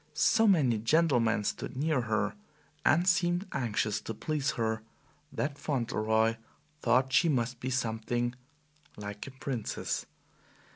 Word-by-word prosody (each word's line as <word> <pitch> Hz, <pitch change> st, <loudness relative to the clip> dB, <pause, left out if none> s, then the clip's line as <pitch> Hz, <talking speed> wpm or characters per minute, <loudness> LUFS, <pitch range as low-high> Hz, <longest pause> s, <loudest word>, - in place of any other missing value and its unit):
So 225 Hz, +8 st, +4 dB
many 140 Hz, -, +4 dB
gentlemen 115 Hz, -4 st, +3 dB
stood 125 Hz, +5 st, -3 dB
near 150 Hz, -1 st, +1 dB
her, 110 Hz, -2 st, 0 dB, 0.5 s
and 170 Hz, +4 st, +3 dB
seemed 175 Hz, +1 st, +2 dB
anxious 110 Hz, -3 st, -1 dB
to 115 Hz, -, -6 dB
please 150 Hz, +3 st, -1 dB
her, 110 Hz, -1 st, 0 dB, 0.5 s
that 145 Hz, 0 st, -3 dB
Fauntleroy 115 Hz, -4 st, +1 dB, 0.4 s
thought 130 Hz, +2 st, +2 dB
she 165 Hz, +3 st, +5 dB
must 125 Hz, -3 st, 0 dB
be 130 Hz, -, -3 dB
something 120 Hz, -1 st, -1 dB, 0.6 s
like 105 Hz, +2 st, -6 dB
a -, -, -7 dB
princess. 125 Hz, -6 st, -3 dB
125 Hz, 125 wpm, -30 LUFS, 110-150 Hz, 0.6 s, she